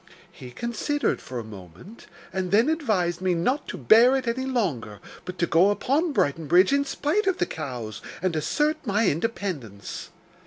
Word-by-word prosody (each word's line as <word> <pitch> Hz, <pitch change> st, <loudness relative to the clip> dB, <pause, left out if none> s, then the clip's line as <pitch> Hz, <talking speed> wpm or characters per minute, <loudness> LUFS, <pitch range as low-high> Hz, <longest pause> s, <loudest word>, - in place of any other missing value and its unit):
He 125 Hz, -, -11 dB
considered 235 Hz, -, -2 dB
for 125 Hz, -, -7 dB
a 120 Hz, -, -4 dB
moment, 100 Hz, -, -13 dB, 0.3 s
and 190 Hz, -1 st, -2 dB
then 225 Hz, +9 st, +4 dB
advised 200 Hz, -, 0 dB
me 185 Hz, -1 st, +1 dB
not 250 Hz, -, 0 dB
to -, -, -5 dB
bear 240 Hz, +4 st, +6 dB
it 265 Hz, -2 st, -2 dB
any 260 Hz, +3 st, -1 dB
longer, 150 Hz, -, -2 dB, 0.3 s
but 180 Hz, 0 st, -7 dB
to 170 Hz, -, +2 dB
go 175 Hz, +4 st, +4 dB
upon 285 Hz, +10 st, +1 dB
Brighton 155 Hz, -, 0 dB
Bridge, 180 Hz, -, +5 dB
in 280 Hz, 0 st, +2 dB
spite 310 Hz, +9 st, -1 dB
of 380 Hz, -1 st, +2 dB
the -, -, +1 dB
cows, 125 Hz, -9 st, -6 dB, 0.2 s
and 185 Hz, -2 st, -1 dB
assert 295 Hz, -, 0 dB
my 215 Hz, -2 st, +1 dB
independence. 155 Hz, -, -3 dB
190 Hz, 170 wpm, -25 LUFS, -, 0.3 s, bear